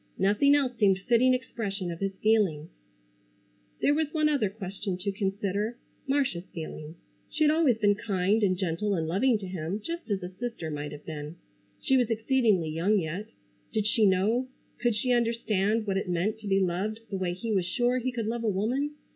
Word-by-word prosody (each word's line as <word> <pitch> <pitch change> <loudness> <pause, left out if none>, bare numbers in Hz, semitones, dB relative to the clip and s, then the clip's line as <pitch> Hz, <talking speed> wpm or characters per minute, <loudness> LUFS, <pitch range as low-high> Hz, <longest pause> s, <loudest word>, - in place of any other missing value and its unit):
Nothing 210 +9 +4
else 265 -4 +1
seemed 195 -3 +4
fitting 240 +5 +3
expression 200 -7 -4
of 165 - -7
his 195 -1 -2
feelings. 205 -9 +2 1.1
There 290 - +5
was 305 -1 0
one 305 -1 +3
other 275 -9 +1
question 195 -2 -5
to 200 +2 -2
consider—Marcia's 200 +2 -2
feelings. 155 -1 -7 0.3
She 310 - 0
had 300 - +5
always 305 -7 +3
been 205 -2 +4
kind 200 0 0
and 185 -3 +2
gentle 195 +3 -1
and 160 -2 -1
loving 220 +8 +2
to 205 - -7
him, 180 +1 -4
just 335 +5 -6
as 200 -2 -1
a 180 - -4
sister 190 -5 -5
might 145 0 -4
have 150 0 -10
been. 150 0 -6 0.5
She 265 - +4
was 245 -2 +2
exceedingly 225 - +2
young 175 +7 +2
yet. 180 +4 -3 0.4
Did 215 -2 0
she 215 0 +3
know, 210 +7 +2 0.3
could 240 -2 +1
she 250 +4 +1
understand 225 -2 +1
what 195 -2 0
it 195 - -2
meant 190 +6 0
to 210 - -8
be 195 0 +3
loved 195 +4 -1
the 195 - -1
way 175 -2 -1
he 225 +5 -4
was 190 -3 +1
sure 245 +6 +1
he 255 +1 -2
could 235 -3 -3
love 230 +1 -2
a 225 - +2
woman? 250 +10 -1
205 Hz, 190 wpm, -28 LUFS, 185-240 Hz, 1.1 s, There